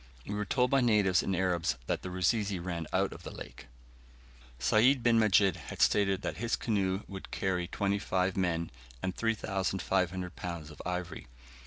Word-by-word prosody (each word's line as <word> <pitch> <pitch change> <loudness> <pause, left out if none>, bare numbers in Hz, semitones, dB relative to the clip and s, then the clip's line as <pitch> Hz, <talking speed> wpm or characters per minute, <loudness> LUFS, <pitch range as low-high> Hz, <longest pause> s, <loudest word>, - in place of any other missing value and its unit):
We 105 - -4
were 105 0 -2
told 125 +4 +1
by 135 -1 +4
natives 105 -6 +4
and 95 - -1
Arabs 90 -4 0
that - - -1
the 95 - -6
Rusizi 100 +2 +1
ran 85 -2 -4
out - - +1
of - - -11
the - - -7
lake. - - -10 0.9
Sayd 115 - +4
bin 115 -1 +5
Majid 100 -4 +4
had - - -9
stated 100 -1 +3
that - - -3
his 115 0 0
canoe 100 -3 0
would 95 -1 -8
carry 90 -2 -1
twenty 100 +2 0
five 95 -1 0
men, 85 -3 0 0.3
and 95 - -2
3,500 95 -4 -1
lbs. 85 -4 -6
of 75 - -10
ivory. 90 -1 -4
95 Hz, 170 wpm, -31 LUFS, 90-105 Hz, 0.9 s, bin